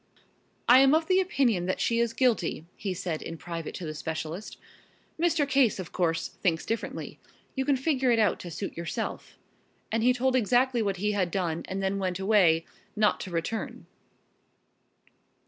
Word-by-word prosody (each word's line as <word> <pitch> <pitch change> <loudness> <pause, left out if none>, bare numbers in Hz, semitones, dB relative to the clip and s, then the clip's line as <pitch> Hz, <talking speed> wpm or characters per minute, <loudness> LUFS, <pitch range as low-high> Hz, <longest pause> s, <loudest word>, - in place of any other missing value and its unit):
"I 250 +2 +8
am 270 +2 +6
of 320 +1 +2
the 370 +2 +3
opinion 250 - +1
that 185 - -1
she 230 0 +1
is 235 -1 +1
guilty," 230 - +1
he 200 - -4
said 175 -3 -3
in 165 - -6
private 165 -1 -6
to 180 - -6
the 155 - -4
specialist. 160 +5 -5 0.6
"Mr. 330 -4 +2
Case, 270 -5 +3
of 185 -3 -7
course, 165 -2 0
thinks 165 -3 +1
differently. 225 0 -4 0.3
You 265 -1 -2
can 285 -1 +3
figure 265 -2 +1
it 235 - +4
out 215 -2 +2
to 175 - -7
suit 180 +4 -5
yourself," 170 0 -5 0.5
and 225 +1 +1
he 245 +2 +5
told 255 +1 +1
exactly 245 +1 +3
what 200 -3 -1
he 210 +3 0
had 195 -4 0
done 170 -3 -1
and 195 +1 -3
then 195 +1 0
went 185 -2 -1
away, 190 -5 +3 0.3
not 210 -1 +2
to 190 - -6
return. 175 +6 -4
205 Hz, 175 wpm, -28 LUFS, 175-250 Hz, 0.6 s, I